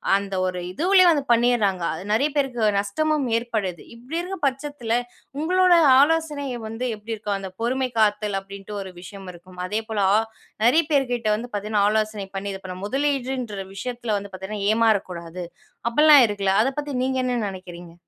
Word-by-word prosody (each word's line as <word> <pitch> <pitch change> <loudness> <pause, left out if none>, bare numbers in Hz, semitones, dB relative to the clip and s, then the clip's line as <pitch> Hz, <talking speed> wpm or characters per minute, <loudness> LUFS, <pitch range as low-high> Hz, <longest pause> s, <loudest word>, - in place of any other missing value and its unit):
அந்த 200 -1 -2
ஒரு 185 -1 -2
இதுவுலேயே 365 - +4
வந்து 300 -4 +2
பண்ணிர்றாங்க. 230 -6 +2
அது 160 +3 -7
நிறைய 275 +7 +2
பேருக்கு 250 -6 +1
நஷ்டமும் 300 +8 0
ஏற்படுது. 215 -7 -3
இப்படி 250 +8 -6
இருக்கிற 370 +2 -4
பட்சத்தில, 270 -3 -3 0.5
உங்களோட 365 +3 +4 0.3
ஆலோசனை 300 -1 +2 0.2
வந்து 225 +3 -4
எப்படி 215 +2 -7
இருக்கும்? 205 -2 -3
அந்த 190 -1 -6
பொறுமை 255 +2 0
காத்தல் 210 -1 +2
அப்படின்ட்டு 195 +1 -9
ஒரு 190 -1 -8
விஷயம் 195 +1 -10
இருக்கும். 180 +1 -15
அதேபோல 220 +1 -2
ஆ - - +5 0.5
நிறைய 300 +8 +5
பேர்கிட்ட 245 -6 +1
வந்து 235 +3 -6
பார்த்தீங்கன்னா 205 0 0
ஆலோசனை 215 -2 -1
பண்ணி 200 +1 -4
இது 195 - -8
பண்ண 185 -1 -6
முதலீடுன்ற 255 -5 -2
விஷயத்தில 235 0 -3
வந்து 200 0 -10
பார்த்தீங்கன்னா 200 +2 -4
ஏமாறக்கூடாது. 185 -6 0 0.4
அப்படிலாம் 295 +1 +7
இருக்குல. 200 -2 0
அதை 270 - 0
பத்தி 290 -1 -5
நீங்க 260 0 0
என்ன 245 -2 0
நினைக்கிறீங்க? 175 -3 -10
220 Hz, 155 wpm, -23 LUFS, 195-270 Hz, 0.5 s, அப்படிலாம்